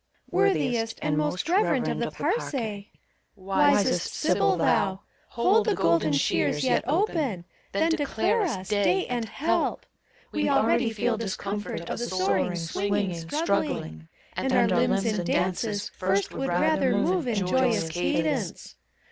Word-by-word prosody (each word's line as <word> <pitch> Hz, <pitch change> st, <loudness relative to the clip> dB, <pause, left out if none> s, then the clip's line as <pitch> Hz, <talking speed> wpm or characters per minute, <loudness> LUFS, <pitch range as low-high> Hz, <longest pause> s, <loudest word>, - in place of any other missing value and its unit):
Worthiest 235 Hz, -, +1 dB
and 150 Hz, 0 st, +1 dB
most 150 Hz, -, -1 dB
reverend 375 Hz, +5 st, +2 dB
of -, -, -2 dB
the -, -, -1 dB
Parcse, 455 Hz, -, -2 dB, 0.8 s
wisest 200 Hz, +10 st, +2 dB
sibyl -, -, +2 dB
thou, 190 Hz, 0 st, +1 dB, 0.3 s
Hold 390 Hz, -, +2 dB
the 425 Hz, -, +2 dB
golden 165 Hz, -2 st, +2 dB
shears 145 Hz, 0 st, +1 dB
yet 130 Hz, -, +2 dB
open, 295 Hz, -, 0 dB, 0.3 s
then 325 Hz, +1 st, +1 dB
declare 325 Hz, +8 st, 0 dB
us 235 Hz, -, -2 dB
Day 200 Hz, -3 st, +2 dB
and 240 Hz, -2 st, -2 dB
Help! 315 Hz, -, -1 dB, 0.5 s
We 300 Hz, -, 0 dB
already 235 Hz, -2 st, +2 dB
feel 225 Hz, +1 st, -1 dB
discomfort 205 Hz, -2 st, -4 dB
of -, -, -4 dB
the 240 Hz, -, -2 dB
soaring, 185 Hz, -2 st, 0 dB
swinging, 195 Hz, +3 st, -1 dB, 0.2 s
struggling; 80 Hz, -, -2 dB, 0.3 s
And -, -, -2 dB
our -, -, +4 dB
limbs 140 Hz, -, +1 dB
in 210 Hz, -5 st, 0 dB
dances 200 Hz, +5 st, -1 dB
first 190 Hz, +1 st, -1 dB
would 270 Hz, -, -3 dB
rather -, -, +2 dB
move 360 Hz, -7 st, +1 dB
in 235 Hz, -, 0 dB
joyous 210 Hz, 0 st, +1 dB
cadence. 165 Hz, -1 st, -2 dB
205 Hz, 135 wpm, -26 LUFS, 185-270 Hz, 0.8 s, our